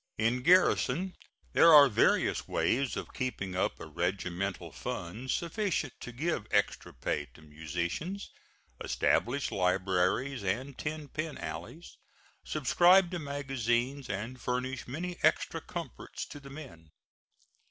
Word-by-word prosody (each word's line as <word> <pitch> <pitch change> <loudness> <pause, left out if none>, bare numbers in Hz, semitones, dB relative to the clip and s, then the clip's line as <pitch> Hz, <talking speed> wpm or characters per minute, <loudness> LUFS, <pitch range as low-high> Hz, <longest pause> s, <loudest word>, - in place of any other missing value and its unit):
In 115 +3 +1
garrison 180 +1 +3 0.4
there 165 - +7
are 145 -2 +10
various 115 - +2
ways 135 +2 +1
of - - -6
keeping 100 -8 -3
up 90 - 0
a - - -7
regimental 90 +3 -2
fund 110 +10 -5
sufficient 170 - -1
to 125 - -7
give 155 +8 -2
extra - - 0
pay 75 -1 -2
to 80 - -15
musicians, 85 - -4 0.5
establish 135 +4 +1
libraries 95 +7 +1
and 125 +9 -2
ten 150 +1 -4
pin 155 +2 -4
alleys, 170 +2 -7 0.5
subscribe 175 +5 +4
to 175 - -2
magazines 135 -2 -1
and 110 +6 -4
furnish 125 0 -2
many 170 +7 -4
extra - - +2
comforts - - -6
to 145 - -8
the 140 -1 -12
men. 130 - -11
130 Hz, 120 wpm, -31 LUFS, 100-155 Hz, 0.5 s, are